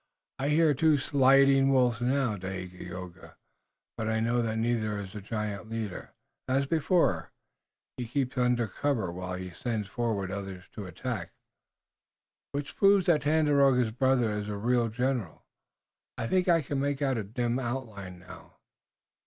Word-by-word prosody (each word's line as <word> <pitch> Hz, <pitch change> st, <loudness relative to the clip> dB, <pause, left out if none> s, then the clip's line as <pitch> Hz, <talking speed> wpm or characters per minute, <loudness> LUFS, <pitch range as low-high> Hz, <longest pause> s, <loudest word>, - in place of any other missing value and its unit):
I 140 Hz, +2 st, 0 dB
hear 155 Hz, 0 st, +4 dB
two 155 Hz, +2 st, +3 dB
sliding 135 Hz, 0 st, +4 dB
wolves 125 Hz, -3 st, +3 dB
now, 125 Hz, -2 st, +1 dB
Dagaeoga, 90 Hz, -1 st, -8 dB, 0.6 s
but 110 Hz, 0 st, -2 dB
I 110 Hz, 0 st, +1 dB
know 120 Hz, +2 st, +1 dB
that 110 Hz, -1 st, -1 dB
neither 110 Hz, -2 st, 0 dB
is 100 Hz, -1 st, -7 dB
the 105 Hz, -, -6 dB
giant 105 Hz, 0 st, -4 dB
leader. 110 Hz, -5 st, -5 dB, 0.3 s
As 135 Hz, +2 st, +2 dB
before, 165 Hz, +4 st, +1 dB, 0.7 s
he 125 Hz, -2 st, -4 dB
keeps 130 Hz, +1 st, -1 dB
under 125 Hz, -2 st, +2 dB
cover, 110 Hz, -4 st, -1 dB
while 90 Hz, +1 st, -5 dB
he 90 Hz, 0 st, -6 dB
sends 110 Hz, +3 st, -3 dB
forward 105 Hz, -4 st, -2 dB
others 95 Hz, -2 st, -6 dB
to -, -, -8 dB
the 95 Hz, -, -6 dB
attack." 110 Hz, +6 st, -5 dB, 1.2 s
"Which 145 Hz, 0 st, -4 dB
proves 200 Hz, -1 st, +5 dB
that 165 Hz, -5 st, +4 dB
Tandakora's 140 Hz, -5 st, +3 dB
brother 125 Hz, -1 st, +2 dB
is 105 Hz, 0 st, -3 dB
a 105 Hz, -, -3 dB
real 120 Hz, +2 st, +2 dB
general. 125 Hz, -5 st, -2 dB, 0.7 s
I -, -, -2 dB
think 185 Hz, +9 st, +1 dB
I 165 Hz, -3 st, +4 dB
can 140 Hz, 0 st, -2 dB
make 140 Hz, 0 st, -1 dB
out 135 Hz, -4 st, +1 dB
a -, -, -2 dB
dim 120 Hz, +4 st, -1 dB
outline 115 Hz, -7 st, -5 dB
now. 90 Hz, 0 st, -13 dB
120 Hz, 155 wpm, -29 LUFS, 105-135 Hz, 1.2 s, proves